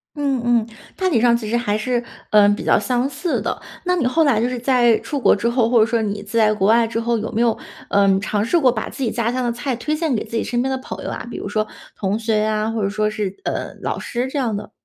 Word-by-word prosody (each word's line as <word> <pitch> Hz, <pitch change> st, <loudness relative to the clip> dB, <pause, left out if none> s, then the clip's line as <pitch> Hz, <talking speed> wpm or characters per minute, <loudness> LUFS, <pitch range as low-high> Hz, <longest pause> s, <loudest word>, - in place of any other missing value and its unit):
嗯 280 Hz, -3 st, 0 dB
嗯， 235 Hz, -2 st, +2 dB, 0.3 s
大 375 Hz, -1 st, 0 dB
体 265 Hz, -10 st, +2 dB
上 235 Hz, 0 st, +4 dB
其 225 Hz, -3 st, -3 dB
实 235 Hz, -, +1 dB
还 210 Hz, -4 st, 0 dB
是， 240 Hz, +2 st, -1 dB, 0.3 s
呃， 210 Hz, -1 st, +6 dB
比 205 Hz, -, -1 dB
较 -, -, +4 dB
相 245 Hz, +5 st, 0 dB
似 300 Hz, +5 st, -2 dB
的。 -, -, -3 dB, 0.3 s
那 360 Hz, 0 st, +2 dB
你 325 Hz, -8 st, 0 dB
后 310 Hz, +7 st, +3 dB
来 270 Hz, -8 st, +3 dB
就 235 Hz, -, +1 dB
是 250 Hz, -1 st, -3 dB
在 245 Hz, -2 st, +4 dB
出 290 Hz, -, -4 dB
国 -, -, +4 dB
之 225 Hz, +3 st, 0 dB
后， 235 Hz, -1 st, +2 dB
或 235 Hz, 0 st, +4 dB
者 215 Hz, -, +6 dB
说 230 Hz, -1 st, 0 dB
你 205 Hz, -1 st, -3 dB
在 215 Hz, +1 st, +2 dB
国 195 Hz, -2 st, +1 dB
外 230 Hz, +2 st, +5 dB
之 225 Hz, 0 st, -3 dB
后， 235 Hz, 0 st, 0 dB
有 220 Hz, -, -4 dB
没 225 Hz, -, 0 dB
有， 235 Hz, -2 st, +2 dB, 0.3 s
呃， 200 Hz, 0 st, +3 dB
尝 205 Hz, +1 st, -1 dB
试 340 Hz, +9 st, +2 dB
过 260 Hz, -5 st, +4 dB
把 220 Hz, -2 st, -4 dB
自 270 Hz, -, -5 dB
己 235 Hz, -, +1 dB
家 235 Hz, 0 st, -1 dB
乡 255 Hz, +1 st, -1 dB
的 240 Hz, -, 0 dB
菜 245 Hz, +2 st, -3 dB
推 300 Hz, +6 st, -2 dB
荐 315 Hz, -2 st, -1 dB
给 215 Hz, -, -1 dB
自 230 Hz, -, -5 dB
己 -, -, 0 dB
身 240 Hz, 0 st, -1 dB
边 265 Hz, -, -1 dB
的 265 Hz, -, 0 dB
朋 260 Hz, -, -8 dB
友 -, -, -4 dB
啊？ -, -, -5 dB
比 -, -, -6 dB
如 -, -, -5 dB
说 215 Hz, +1 st, -1 dB, 0.3 s
同 200 Hz, +1 st, -1 dB
学 225 Hz, -1 st, 0 dB
呀， 215 Hz, 0 st, 0 dB
或 225 Hz, -2 st, -2 dB
者 195 Hz, -, +1 dB
说 215 Hz, +1 st, 0 dB
是 210 Hz, -3 st, -3 dB
呃， -, -, -3 dB
老 -, -, -2 dB
师 245 Hz, +2 st, -3 dB
这 265 Hz, -, -5 dB
样 240 Hz, -6 st, 0 dB
的？ 210 Hz, +1 st, -6 dB
235 Hz, 305 characters per minute, -20 LUFS, 215-255 Hz, 0.3 s, 呃